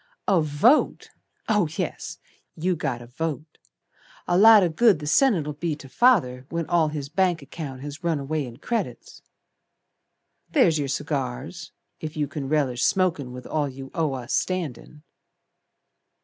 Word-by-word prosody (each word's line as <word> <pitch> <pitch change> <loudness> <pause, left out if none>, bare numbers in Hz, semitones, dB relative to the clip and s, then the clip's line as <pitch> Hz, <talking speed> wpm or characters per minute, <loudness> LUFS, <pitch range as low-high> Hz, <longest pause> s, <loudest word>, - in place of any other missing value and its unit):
"A 190 -4 +4
vote! 155 - +2 0.4
Oh, 210 -5 +2
yes, - - -4 0.4
you 180 +3 0
got 120 -6 -3
a - - -11
vote! 155 +4 -5 0.7
A 175 - +2
lot 215 +1 +8
o' 175 - +2
good 210 +4 +4
the 150 - -8
Senate'll 160 - +2
be 155 +1 -2
to 145 -2 -12
Father 135 - +2
When 170 0 -2
all 170 -1 +2
his 150 -2 -4
bank 175 0 +1
account 140 -3 -7
Has 145 +4 -8
run 165 -2 +1
away 145 0 -2
in 120 -1 -11
credits. 230 - -4 1.3
There's 175 - +3
your 140 - -1
cigars, 135 +1 -4 0.3
If 155 0 -6
you 150 -1 0
can 140 -1 -5
relish 135 -5 +1
smokin' 170 -9 +1
With 125 0 -9
all 150 -2 -1
you 135 0 -9
owe 160 -5 0
us 125 -2 -5
standin'." 155 -4 -3
155 Hz, 150 wpm, -24 LUFS, 135-175 Hz, 1.3 s, lot